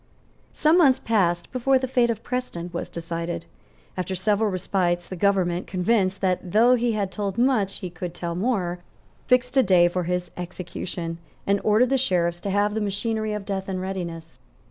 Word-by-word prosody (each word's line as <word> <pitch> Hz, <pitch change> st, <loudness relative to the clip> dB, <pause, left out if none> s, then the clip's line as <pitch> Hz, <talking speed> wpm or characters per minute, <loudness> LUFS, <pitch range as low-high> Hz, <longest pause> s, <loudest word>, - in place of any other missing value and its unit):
Some 315 Hz, +3 st, +3 dB
months 275 Hz, -6 st, +6 dB
passed 175 Hz, -6 st, 0 dB
before 260 Hz, +1 st, +3 dB
the 260 Hz, 0 st, -2 dB
fate 245 Hz, -2 st, +2 dB
of 230 Hz, -1 st, -2 dB
Preston 245 Hz, -9 st, -4 dB
was 170 Hz, -, -4 dB
decided. 170 Hz, 0 st, -4 dB, 0.5 s
After 185 Hz, +1 st, -3 dB
several 210 Hz, +3 st, +1 dB
respites, 180 Hz, -2 st, 0 dB
the 185 Hz, -, -6 dB
government, 185 Hz, -2 st, +1 dB
convinced 190 Hz, 0 st, +1 dB
that, 185 Hz, -2 st, -1 dB
though 235 Hz, +4 st, +6 dB
he 240 Hz, -1 st, +1 dB
had 200 Hz, -3 st, -1 dB
told 200 Hz, +2 st, -3 dB
much, 235 Hz, -6 st, +1 dB
he 180 Hz, -, -5 dB
could 175 Hz, 0 st, -6 dB
tell 170 Hz, -1 st, -4 dB
more, 180 Hz, -3 st, -1 dB, 0.5 s
fixed 250 Hz, +1 st, +2 dB
a -, -, +8 dB
day 185 Hz, -6 st, +5 dB
for 175 Hz, 0 st, -2 dB
his 180 Hz, 0 st, -2 dB
execution, 175 Hz, -1 st, -5 dB, 0.3 s
and 200 Hz, 0 st, +1 dB
ordered 215 Hz, +4 st, +4 dB
the 270 Hz, -, +3 dB
sheriffs 175 Hz, -7 st, +1 dB
to 200 Hz, -, -4 dB
have 205 Hz, +1 st, +1 dB
the 220 Hz, -, -1 dB
machinery 215 Hz, +2 st, -1 dB
of 210 Hz, -2 st, -4 dB
death 195 Hz, -1 st, -3 dB
in 185 Hz, -1 st, -2 dB
readiness. 170 Hz, -6 st, -5 dB
195 Hz, 180 wpm, -24 LUFS, 175-225 Hz, 0.5 s, a